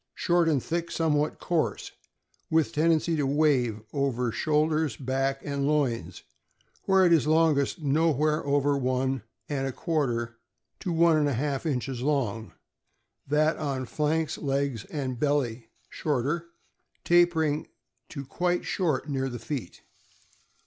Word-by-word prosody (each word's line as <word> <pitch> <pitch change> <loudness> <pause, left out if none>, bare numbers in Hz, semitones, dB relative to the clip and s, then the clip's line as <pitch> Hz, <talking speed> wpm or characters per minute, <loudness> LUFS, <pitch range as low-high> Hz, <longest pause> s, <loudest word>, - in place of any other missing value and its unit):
— - - -58
Short 170 -1 +3
and 140 -5 +1
thick, 170 0 -2
somewhat 150 -3 0
coarse, 155 - -1 0.6
with 160 -1 +2
tendency 165 +1 +2
to 145 -2 +1
wave 135 -7 +1
over 125 -4 0
shoulders, 155 -2 +1
back, 135 +1 -1
and 140 -1 -1
loins, 140 -6 -1 0.6
where 190 -1 +5
it 170 - +5
is 155 -2 +3
longest— 155 -2 +2
nowhere 150 +1 +2
over 145 0 +2
one 130 -1 0 0.3
and 135 -2 -2
a - - -2
quarter 120 -7 -2 0.4
to 180 - -3
one 165 -1 +4
and 150 -1 +2
a - - -1
half 140 +4 -2
inches 130 -3 -2
long; 115 - -1 0.7
that 155 +3 +2
on 135 -4 -2
flanks, 155 +3 -1
legs, 140 -5 -1
and 130 -5 -4
belly 130 -6 0 0.2
shorter, 150 +4 -2 0.6
tapering 165 -3 +3 0.4
to 140 -3 -7
quite 175 +5 -1
short 155 -7 -1
near 135 -2 -1
the 120 - -5
feet. 125 - -6
145 Hz, 135 wpm, -27 LUFS, 130-160 Hz, 0.7 s, where